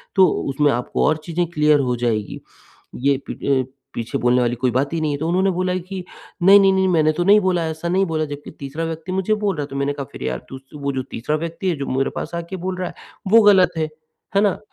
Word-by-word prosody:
तो 190 Hz, -1 st, +7 dB, 0.2 s
उसमें 145 Hz, +2 st, +2 dB
आपको 120 Hz, 0 st, -1 dB
और 155 Hz, -, +2 dB
चीज़ें 175 Hz, +1 st, -1 dB
क्लियर 150 Hz, -2 st, +3 dB
हो 125 Hz, -3 st, 0 dB
जाएगी। 115 Hz, -4 st, -2 dB, 0.5 s
ये 140 Hz, +2 st, +1 dB
पीठ -, -, -7 dB, 0.2 s
अ, -, -, -28 dB, 0.2 s
पीछे 115 Hz, 0 st, -3 dB
बोलने 125 Hz, +1 st, +2 dB
वाली 120 Hz, 0 st, +1 dB
कोई 125 Hz, +1 st, 0 dB
बात 135 Hz, +3 st, 0 dB
ही 165 Hz, -, 0 dB
नहीं 155 Hz, -1 st, 0 dB
है। 145 Hz, -, -2 dB
तो 155 Hz, +3 st, -3 dB
उन्होंने 190 Hz, +3 st, +2 dB
बोला 185 Hz, 0 st, -1 dB
कि 185 Hz, +1 st, -6 dB, 0.4 s
"नहीं-नहीं-नहीं 195 Hz, 0 st, +6 dB
मैंने 160 Hz, -4 st, +3 dB
तो 175 Hz, +3 st, -1 dB
नहीं 205 Hz, +3 st, +6 dB
बोला 180 Hz, -3 st, +1 dB
ऐसा, 160 Hz, +1 st, -4 dB
नहीं 190 Hz, +2 st, +2 dB
बोला।" 160 Hz, -3 st, -1 dB
जब्कि 145 Hz, -1 st, -8 dB
तीसरा 140 Hz, +4 st, -5 dB
व्यक्ति 165 Hz, +2 st, -5 dB
मुझे 190 Hz, +3 st, 0 dB
बोल 210 Hz, -2 st, 0 dB
रहा 150 Hz, -, -3 dB
है। -, -, -6 dB
तो 140 Hz, -, -9 dB
मैंने 140 Hz, +1 st, 0 dB
कहा 140 Hz, -1 st, -5 dB
फिर -, -, -8 dB
यार 65 Hz, -1 st, -2 dB
तू 135 Hz, -, -7 dB
स 135 Hz, 0 st, -35 dB
वो 140 Hz, -, 0 dB
जो 130 Hz, -, -1 dB
तीसरा 135 Hz, +7 st, -2 dB
व्यक्ति 170 Hz, +4 st, -3 dB
है 175 Hz, -, 0 dB
जो 140 Hz, -, -3 dB
मेरे 135 Hz, +1 st, 0 dB
पास -, -, -5 dB
आके 170 Hz, +2 st, -5 dB
बोल 185 Hz, -1 st, -2 dB
रहा 185 Hz, -1 st, -2 dB
है -, -, -11 dB, 0.4 s
वो 230 Hz, +1 st, +8 dB
गलत 190 Hz, -4 st, +6 dB
है। 160 Hz, -, +1 dB, 0.5 s
है 200 Hz, -, +5 dB
ना? 205 Hz, -2 st, +1 dB
160 Hz, 255 wpm, -21 LUFS, 140-185 Hz, 0.5 s, वो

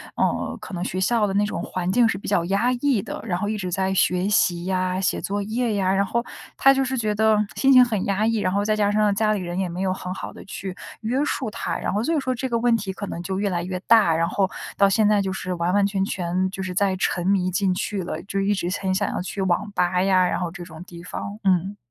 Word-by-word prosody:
呃， -, -, -1 dB
可 -, -, -9 dB
能 175 Hz, -, -3 dB
学 185 Hz, -, -3 dB
校 215 Hz, +2 st, +2 dB
的 195 Hz, -, -2 dB
那 205 Hz, +1 st, +2 dB
种 210 Hz, -, -3 dB
环 185 Hz, 0 st, -2 dB
境 235 Hz, +3 st, +4 dB
是 225 Hz, -, -1 dB
比 -, -, -6 dB
较 175 Hz, -4 st, +2 dB
压 200 Hz, +7 st, +1 dB
抑 255 Hz, -3 st, +1 dB
的， -, -, -6 dB
然 180 Hz, -5 st, -1 dB
后 205 Hz, +3 st, -2 dB
一 215 Hz, -, -2 dB
直 185 Hz, -3 st, -4 dB
在 190 Hz, +2 st, 0 dB
学 180 Hz, 0 st, +2 dB
习 175 Hz, -4 st, +2 dB
呀、 185 Hz, 0 st, -1 dB
写 190 Hz, -, 0 dB
作 205 Hz, +1 st, -2 dB
业 225 Hz, +3 st, -1 dB
呀， 190 Hz, -1 st, +1 dB
然 195 Hz, +1 st, +2 dB
后 235 Hz, +4 st, -1 dB, 0.3 s
他 270 Hz, -, +6 dB
就 270 Hz, 0 st, +1 dB
是 260 Hz, +1 st, -2 dB
觉 215 Hz, -3 st, 0 dB
得 220 Hz, +1 st, +3 dB, 0.2 s
心 270 Hz, 0 st, +4 dB
情 255 Hz, -1 st, +9 dB
很 220 Hz, -6 st, -1 dB
压 200 Hz, +2 st, +1 dB
抑， 225 Hz, 0 st, +1 dB
然 185 Hz, -3 st, 0 dB
后 200 Hz, -, +1 dB
再 215 Hz, +1 st, +1 dB
加 210 Hz, -1 st, +2 dB
上 210 Hz, 0 st, +2 dB
家 215 Hz, +1 st, +2 dB
里 205 Hz, -, -2 dB
人 175 Hz, +1 st, -4 dB
也 190 Hz, -, 0 dB
没 175 Hz, +2 st, -5 dB
有 185 Hz, -1 st, +1 dB
很 185 Hz, -1 st, -5 dB
好 -, -, -6 dB
地 -, -, -12 dB
去 190 Hz, -1 st, -6 dB, 0.3 s
约 240 Hz, +5 st, 0 dB
束 255 Hz, -6 st, -2 dB
他， -, -, -3 dB
然 -, -, -3 dB
后 205 Hz, -, 0 dB
所 325 Hz, +8 st, 0 dB
以 -, -, +2 dB
说 260 Hz, -1 st, -1 dB
这 255 Hz, +2 st, -3 dB
个 235 Hz, -2 st, 0 dB
问 235 Hz, -1 st, +3 dB
题 195 Hz, -3 st, -4 dB
可 200 Hz, -, -6 dB
能 170 Hz, -, -5 dB
就 190 Hz, +2 st, -3 dB
越 200 Hz, 0 st, 0 dB
来 175 Hz, -2 st, -1 dB
越 185 Hz, +1 st, -3 dB
大， 215 Hz, -8 st, +5 dB
然 165 Hz, +1 st, +1 dB
后 190 Hz, +1 st, +1 dB, 0.3 s
到 200 Hz, 0 st, +5 dB
现 210 Hz, +1 st, +3 dB
在 210 Hz, -1 st, +3 dB
就 190 Hz, -1 st, -2 dB
是 185 Hz, -1 st, -4 dB
完 170 Hz, +1 st, 0 dB
完 200 Hz, 0 st, +4 dB
全 195 Hz, -1 st, 0 dB
全 185 Hz, 0 st, -1 dB
就 190 Hz, 0 st, -5 dB
是 185 Hz, -1 st, -4 dB
在 190 Hz, 0 st, +1 dB
沉 180 Hz, -1 st, -1 dB
迷 185 Hz, -2 st, +2 dB
进 185 Hz, +1 st, +1 dB
去 195 Hz, +1 st, -2 dB
了， 175 Hz, -, -5 dB
就 195 Hz, 0 st, -3 dB
一 195 Hz, +1 st, +2 dB
直 180 Hz, -3 st, -2 dB
很 190 Hz, -1 st, 0 dB
想 -, -, 0 dB
要 -, -, -3 dB
去 190 Hz, +2 st, -5 dB
网 190 Hz, +2 st, 0 dB
吧 180 Hz, -1 st, +1 dB
呀， 185 Hz, -1 st, +4 dB
然 -, -, -1 dB
后 175 Hz, -1 st, -2 dB
这 175 Hz, 0 st, -8 dB
种 165 Hz, -2 st, -11 dB
地 170 Hz, -2 st, -11 dB
方， 200 Hz, +3 st, -6 dB
嗯。 190 Hz, +1 st, +1 dB
195 Hz, 300 characters per minute, -23 LUFS, 185-215 Hz, 0.3 s, 情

